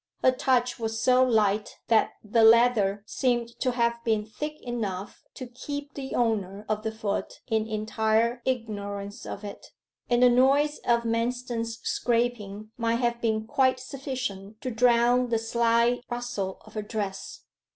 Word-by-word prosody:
Her 255 Hz, -, +6 dB
touch 255 Hz, -1 st, +1 dB
was 225 Hz, 0 st, -2 dB
so 255 Hz, +2 st, +4 dB
light 215 Hz, -4 st, +1 dB
that 225 Hz, -2 st, +3 dB
the 225 Hz, +2 st, +2 dB
leather 220 Hz, -3 st, +5 dB
seemed 240 Hz, +1 st, 0 dB
to 255 Hz, -2 st, 0 dB
have 235 Hz, -1 st, 0 dB
been 220 Hz, -2 st, +1 dB
thick 300 Hz, +8 st, -6 dB
enough 210 Hz, -6 st, -4 dB
to 255 Hz, -, -6 dB
keep 285 Hz, +4 st, -7 dB
the 270 Hz, -1 st, -5 dB
owner 210 Hz, -4 st, -1 dB
of 215 Hz, 0 st, -1 dB
the 220 Hz, -, -2 dB
foot 220 Hz, -2 st, -4 dB
in 220 Hz, -2 st, 0 dB
entire 220 Hz, +2 st, 0 dB
ignorance 205 Hz, -5 st, -4 dB
of 200 Hz, -, -6 dB
it, 200 Hz, -1 st, -8 dB, 0.4 s
and 240 Hz, 0 st, +3 dB
the 250 Hz, -, +8 dB
noise 275 Hz, +4 st, +3 dB
of 235 Hz, -1 st, +3 dB
Manston's 230 Hz, 0 st, -2 dB
scraping 220 Hz, -3 st, -1 dB
might 230 Hz, -1 st, +1 dB
have 235 Hz, 0 st, 0 dB
been 220 Hz, -1 st, 0 dB
quite 260 Hz, +2 st, +2 dB
sufficient 250 Hz, -6 st, -5 dB
to 255 Hz, -, -3 dB
drown 240 Hz, +1 st, +3 dB
the 230 Hz, -, +2 dB
slight 235 Hz, +1 st, +2 dB
rustle 240 Hz, -6 st, -3 dB
of -, -, -15 dB
her 215 Hz, -, -3 dB
dress. 205 Hz, -2 st, -5 dB
235 Hz, 150 wpm, -27 LUFS, 215-245 Hz, 0.4 s, the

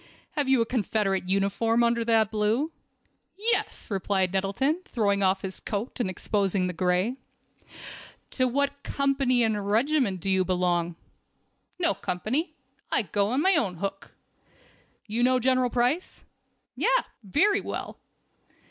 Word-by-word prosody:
"Have 285 Hz, -3 st, -1 dB
you 265 Hz, -3 st, +4 dB
a -, -, +2 dB
Confederate 205 Hz, -5 st, -1 dB
uniform 200 Hz, +4 st, +2 dB
under 235 Hz, 0 st, +2 dB
that 225 Hz, -2 st, +3 dB
blue?" 220 Hz, +8 st, +1 dB, 0.7 s
"Yes," 445 Hz, -, -1 dB
replied 190 Hz, -1 st, 0 dB
Nettleton, 200 Hz, -, 0 dB
throwing 205 Hz, -, 0 dB
off 190 Hz, 0 st, +2 dB
his 190 Hz, -1 st, -5 dB
coat 210 Hz, +5 st, -4 dB
and 235 Hz, -, 0 dB
exposing 195 Hz, 0 st, 0 dB
the 180 Hz, -, -2 dB
gray. 180 Hz, +8 st, 0 dB, 1.1 s
"To 255 Hz, -1 st, +1 dB
what 280 Hz, +2 st, -1 dB
company 275 Hz, -4 st, +1 dB
and 210 Hz, -3 st, -1 dB
regiment 235 Hz, -3 st, +2 dB
do 185 Hz, -, -6 dB
you 190 Hz, 0 st, +3 dB
belong?" 175 Hz, -2 st, 0 dB, 0.8 s
"No 350 Hz, -2 st, +2 dB
company. 270 Hz, -, -2 dB, 0.4 s
I -, -, +2 dB
go 205 Hz, 0 st, 0 dB
it -, -, -2 dB
on 285 Hz, -, +1 dB
my 385 Hz, -, +5 dB
own 205 Hz, -, +1 dB
hook." 195 Hz, +3 st, -5 dB, 0.9 s
"You 225 Hz, +2 st, -2 dB
know 255 Hz, +1 st, +4 dB
General 255 Hz, 0 st, +2 dB
Price?" 250 Hz, +9 st, -1 dB, 0.5 s
"Yes, -, -, +2 dB, 0.2 s
very 370 Hz, -, +2 dB
well." -, -, -6 dB
225 Hz, 140 wpm, -27 LUFS, 195-265 Hz, 1.1 s, my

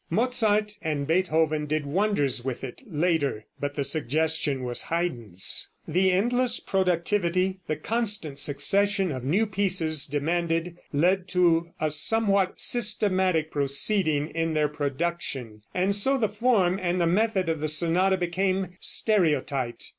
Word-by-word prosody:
Mozart 210 Hz, 0 st, 0 dB
and 150 Hz, -3 st, -2 dB
Beethoven 160 Hz, -2 st, 0 dB
did 155 Hz, 0 st, -2 dB
wonders 145 Hz, -, 0 dB
with 130 Hz, -1 st, -5 dB
it 130 Hz, -, -8 dB
later, 155 Hz, -, -1 dB
but 145 Hz, 0 st, -4 dB
the 140 Hz, -, -1 dB
suggestion 145 Hz, 0 st, 0 dB
was 125 Hz, -1 st, +1 dB
Haydn's. 120 Hz, -, -1 dB, 0.2 s
The 185 Hz, +4 st, +2 dB
endless 240 Hz, +6 st, +1 dB
productivity, 185 Hz, 0 st, 0 dB
the 155 Hz, -, -1 dB
constant 205 Hz, -5 st, -1 dB
succession 190 Hz, +7 st, +2 dB
of 130 Hz, -3 st, -6 dB
new 180 Hz, -, +1 dB
pieces 185 Hz, -7 st, +1 dB
demanded, 165 Hz, +3 st, -2 dB, 0.2 s
led 180 Hz, +5 st, +1 dB
to 170 Hz, -2 st, +1 dB
a 155 Hz, -1 st, 0 dB
somewhat 195 Hz, +4 st, +3 dB
systematic 190 Hz, -8 st, +1 dB
proceeding 150 Hz, +2 st, +1 dB
in 165 Hz, -1 st, -2 dB
their 150 Hz, -1 st, +1 dB
production, 140 Hz, -6 st, -4 dB
and 185 Hz, +2 st, 0 dB
so 265 Hz, +8 st, +3 dB
the 225 Hz, -4 st, +1 dB
form 205 Hz, -4 st, +1 dB
and 180 Hz, 0 st, -1 dB
the 170 Hz, -, +2 dB
method 190 Hz, +1 st, 0 dB
of 160 Hz, -1 st, -1 dB
the 155 Hz, -, -2 dB
sonata 175 Hz, +5 st, +2 dB
became 185 Hz, +1 st, -2 dB
stereotyped. 145 Hz, -, +1 dB
170 Hz, 130 wpm, -25 LUFS, 150-195 Hz, 0.2 s, somewhat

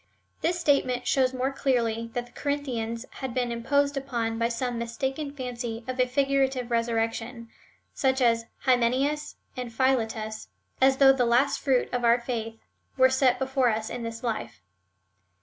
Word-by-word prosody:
This 350 Hz, +1 st, 0 dB
statement 255 Hz, -6 st, +1 dB
shows 260 Hz, 0 st, +2 dB
more 260 Hz, +1 st, -1 dB
clearly 230 Hz, -4 st, 0 dB
that 245 Hz, 0 st, -2 dB
the 240 Hz, -, -19 dB
Corinthians 250 Hz, -6 st, -3 dB, 0.2 s
had 260 Hz, -3 st, -4 dB
been 245 Hz, -2 st, 0 dB
imposed 280 Hz, +5 st, +1 dB
upon 235 Hz, -4 st, -2 dB
by 230 Hz, 0 st, +1 dB
some 240 Hz, 0 st, -2 dB
mistaken 265 Hz, +5 st, -3 dB
fancy 245 Hz, -4 st, -5 dB
of 255 Hz, 0 st, -4 dB
a 250 Hz, -, +4 dB
figurative 270 Hz, -2 st, +1 dB
resurrection, 230 Hz, 0 st, -1 dB, 0.4 s
such 265 Hz, 0 st, +1 dB
as 230 Hz, -2 st, +2 dB
Hymen 245 Hz, -3 st, +3 dB
eus 295 Hz, +3 st, -1 dB, 0.2 s
and 250 Hz, -2 st, -5 dB
Philetus, 225 Hz, -3 st, -1 dB, 0.3 s
as 265 Hz, 0 st, +5 dB
though 270 Hz, -1 st, +7 dB
the 260 Hz, -2 st, +1 dB
last 245 Hz, +4 st, +2 dB
fruit 260 Hz, -3 st, +2 dB
of 245 Hz, -1 st, -1 dB
our 235 Hz, +1 st, +5 dB
faith 225 Hz, -2 st, -4 dB, 0.4 s
were 260 Hz, 0 st, +5 dB
set 260 Hz, -1 st, +3 dB
before 265 Hz, -1 st, +1 dB
us 220 Hz, 0 st, -2 dB
in 245 Hz, -, -4 dB
this 230 Hz, 0 st, -6 dB
life. 225 Hz, -, -4 dB
250 Hz, 160 wpm, -27 LUFS, 230-265 Hz, 0.4 s, though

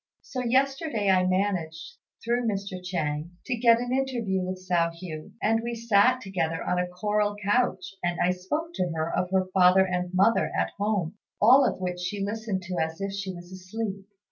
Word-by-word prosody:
So 255 Hz, -2 st, -4 dB
yesterday 260 Hz, -3 st, +1 dB
I 185 Hz, -1 st, +3 dB
managed, 185 Hz, -4 st, -1 dB, 0.3 s
through 240 Hz, 0 st, +1 dB
Mr. 195 Hz, -3 st, -3 dB
Chiang, 170 Hz, -2 st, -3 dB
to 255 Hz, -, -1 dB
get 230 Hz, -1 st, +5 dB
an 245 Hz, +1 st, -2 dB
interview 240 Hz, -8 st, 0 dB
with 185 Hz, +1 st, -3 dB
Hsiao 170 Hz, -2 st, +2 dB
hui; 155 Hz, -4 st, -7 dB
and 225 Hz, +1 st, +2 dB
we 235 Hz, +1 st, -3 dB
sat 230 Hz, +2 st, +3 dB
together 175 Hz, -6 st, -2 dB
on 180 Hz, -, 0 dB
a 180 Hz, -, 0 dB
coral 205 Hz, +3 st, 0 dB
couch, 205 Hz, -3 st, 0 dB
and 175 Hz, 0 st, -1 dB
I 180 Hz, -, +3 dB
spoke 295 Hz, -, -3 dB
to 180 Hz, -, -1 dB
her 160 Hz, +1 st, -1 dB
of 180 Hz, -, 0 dB
her 190 Hz, 0 st, +2 dB
father 185 Hz, 0 st, +6 dB
and 180 Hz, -1 st, -2 dB
mother 195 Hz, +5 st, +3 dB
at -, -, 0 dB
home, 205 Hz, -2 st, -1 dB, 0.2 s
all 255 Hz, +5 st, +6 dB
of -, -, -10 dB
which 180 Hz, -1 st, -3 dB
she 195 Hz, +2 st, -2 dB
listened 210 Hz, -2 st, -3 dB
to 180 Hz, 0 st, -5 dB
as 160 Hz, 0 st, -3 dB
if 195 Hz, 0 st, -3 dB
she 200 Hz, -1 st, -4 dB
was 175 Hz, 0 st, -11 dB
asleep. 195 Hz, +1 st, -5 dB
195 Hz, 190 wpm, -27 LUFS, 180-225 Hz, 0.3 s, father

